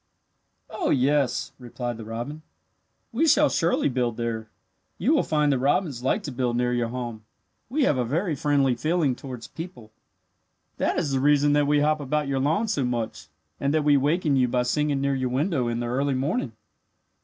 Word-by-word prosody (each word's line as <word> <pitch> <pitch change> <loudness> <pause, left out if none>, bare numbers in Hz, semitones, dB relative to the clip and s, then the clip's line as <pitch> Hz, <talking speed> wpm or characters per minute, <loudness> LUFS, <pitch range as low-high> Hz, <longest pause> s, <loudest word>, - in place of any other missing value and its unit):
"Oh, - - -2
yes," 135 -1 +1
replied 120 -1 -5
the 115 - -8
robin. 120 +8 -6 0.7
"We 300 +8 +1
shall 295 0 +5
surely 170 +1 +1
build 125 -4 -1
there. 115 -2 -3 0.5
You 250 - +2
will 305 - +4
find 150 -2 +1
that 135 - +1
robins 140 -1 0
like 165 - 0
to 145 - -5
build 125 -2 -1
near 125 0 +1
your 120 -1 0
home. 120 -2 -5 0.5
We 290 +4 +1
have 140 - +2
a - - +2
very 160 - -1
friendly 140 -2 +2
feeling 150 +2 0
towards 125 -3 -8
people. 165 -10 -9 0.9
That - - 0
is 145 - 0
the 135 - +1
reason 145 +1 +4
that 145 -1 +3
we 145 0 +3
hop 155 +1 +2
about 150 +1 -1
your 135 -1 0
lawn 160 +11 +1
so 195 -11 0
much 115 -11 -3 0.3
and 140 +2 0
that 155 - +2
we 145 -1 +4
waken 145 +2 +2
you 130 -2 +3
by 125 0 +1
singing 145 +2 0
near 140 0 +1
your 130 -1 -1
window 135 0 0
in 120 0 -2
the - - -2
early 135 +3 0
morning." 135 - -1
140 Hz, 190 wpm, -25 LUFS, 125-150 Hz, 0.9 s, shall